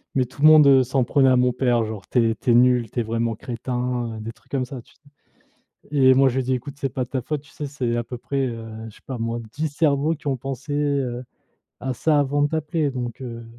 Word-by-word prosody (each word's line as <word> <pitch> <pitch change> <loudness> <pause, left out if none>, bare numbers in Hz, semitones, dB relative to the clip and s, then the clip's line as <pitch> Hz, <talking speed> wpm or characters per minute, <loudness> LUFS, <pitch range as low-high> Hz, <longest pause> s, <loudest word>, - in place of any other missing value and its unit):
Mais 130 - +2
tout 130 +3 -13
le 155 - +8
monde, 155 -2 +8
heu, 135 -1 +6
s'en 130 +1 0
prenait 135 +2 +3
à 130 - +5
mon 125 0 +3
père, 120 -2 +1
genre: 110 -3 -6
«Tu 115 -3 +3
es - - -3
tu 120 - 0
es - - +5
nul, 125 -2 +4
tu 125 - -4
es 120 - +1
vraiment 115 +1 -1
crétin», 125 0 -3
heu, - - -7
des 115 +1 -5
trucs - - -26
comme 130 -2 0
ça, 125 -1 -8
tu - - -24
sais? - - -36 0.9
Et 130 -3 +5
moi, 135 0 +5
je 125 - -3
lui 130 - +1
dis: 130 +1 0
«Écoute, 130 +3 -5
c'est 135 - -1
pas 130 -1 -3
de 125 - -18
ta 130 - -1
faute, 145 +3 -3
tu 150 - -20
sais, 150 - -5
c'est 130 -4 -2
à 120 - -1
peu 125 +2 -7
près, 135 +2 -2
heu, 115 -2 -6 0.2
je 105 - -14
sais - - -19
pas 130 -2 -5
moi, 115 +1 -2
10 155 +2 -2
cerveaux 145 +1 +1
qui 150 -1 -16
ont 135 - 0
pensé, 135 +3 -6
heu, 140 -4 -1 0.6
à 130 0 -3
ça 150 +5 +2
avant 145 +1 +1
de 145 - +3
t'appeler, 160 -1 -1
donc, 125 -1 -5
heu, 115 -2 -7
130 Hz, 275 wpm, -23 LUFS, 120-140 Hz, 0.9 s, le